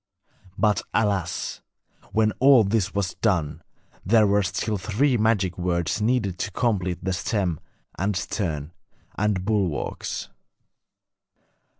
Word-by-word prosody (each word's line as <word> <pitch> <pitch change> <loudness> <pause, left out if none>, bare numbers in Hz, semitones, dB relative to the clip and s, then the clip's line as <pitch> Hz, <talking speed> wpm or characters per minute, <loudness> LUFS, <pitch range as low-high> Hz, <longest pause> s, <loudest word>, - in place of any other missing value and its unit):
But, 105 -2 +2
alas! 100 -6 -1 0.5
when 110 0 +3
all 130 -3 +7
this 100 -1 0
was 100 -3 -1
done, 90 -9 0 0.4
there 110 +3 +4
were 100 0 +3
still 100 +2 -2
three 120 +8 +1
magic 105 -5 +1
words 85 +2 -1
needed 105 -5 0
to 100 - -2
complete 95 -5 -1
the 95 - 0
stem 90 -2 -1 0.4
and 100 +2 0
stern 80 -6 -3 0.4
and 100 -3 0
bulwarks. 95 -9 -2
100 Hz, 110 wpm, -24 LUFS, 90-110 Hz, 0.5 s, all